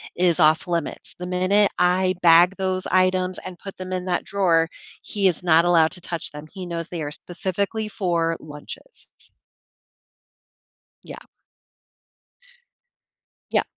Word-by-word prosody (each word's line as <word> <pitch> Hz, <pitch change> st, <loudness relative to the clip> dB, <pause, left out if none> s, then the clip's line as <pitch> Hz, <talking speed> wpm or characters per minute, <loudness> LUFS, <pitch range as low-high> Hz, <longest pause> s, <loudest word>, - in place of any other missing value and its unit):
is 175 Hz, -1 st, +2 dB
off-limits, 160 Hz, +1 st, +1 dB
the 180 Hz, -, -7 dB
minute 185 Hz, +3 st, +2 dB
I 185 Hz, +1 st, +3 dB
bag 175 Hz, +2 st, +6 dB
those 185 Hz, -1 st, -1 dB
items 185 Hz, 0 st, +1 dB
and 185 Hz, -1 st, -9 dB
put 195 Hz, -, -9 dB
them 185 Hz, 0 st, -7 dB
in 185 Hz, 0 st, -3 dB
that 180 Hz, -1 st, -1 dB
drawer, 170 Hz, -5 st, +2 dB, 0.3 s
he 200 Hz, -2 st, 0 dB
is 180 Hz, -, 0 dB
not 165 Hz, 0 st, +5 dB
allowed 165 Hz, -2 st, +4 dB
to 180 Hz, -, -8 dB
touch 170 Hz, -2 st, -4 dB
them, 150 Hz, +1 st, -9 dB
he 185 Hz, -2 st, -7 dB
knows 170 Hz, -1 st, -4 dB
they 170 Hz, -3 st, -5 dB
are 145 Hz, 0 st, -4 dB
specifically 195 Hz, +6 st, -3 dB
for 170 Hz, -4 st, -1 dB
lunches 150 Hz, -, -10 dB
s -, -, -9 dB, 1.7 s
Yeah. -, -, -9 dB, 2.3 s
Yeah. -, -, +3 dB
180 Hz, 135 wpm, -23 LUFS, 165-185 Hz, 2.3 s, bag